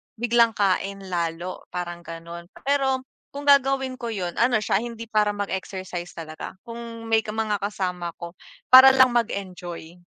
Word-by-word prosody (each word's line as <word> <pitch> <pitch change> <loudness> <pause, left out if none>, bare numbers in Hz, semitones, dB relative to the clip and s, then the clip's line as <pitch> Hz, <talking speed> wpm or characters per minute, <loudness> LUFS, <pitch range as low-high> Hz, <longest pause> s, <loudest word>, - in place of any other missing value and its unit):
biglang 235 -1 +3
kain 195 0 0
lalo 170 +1 -3
parang 175 -1 -4
ganun. 170 +1 -9 0.2
Pero 270 -2 +1 0.3
kung 285 +1 -7
gagawin 270 -2 +4
ko 235 - -4
yun 180 -5 -4
ano 240 -2 +3
siya, 200 - +2
hindi 230 0 -6
para 210 -1 +2
mag-exercise 190 -3 -5
talaga 160 +1 -8
kung 230 -1 -8
may 225 0 +3
mga 215 -1 -1
kasama 185 -4 -3
ko 170 0 -7 0.4
para 260 +1 +11
lang 260 -1 +6
mag-enjoy. 180 -6 -4
205 Hz, 140 wpm, -24 LUFS, 180-235 Hz, 0.4 s, para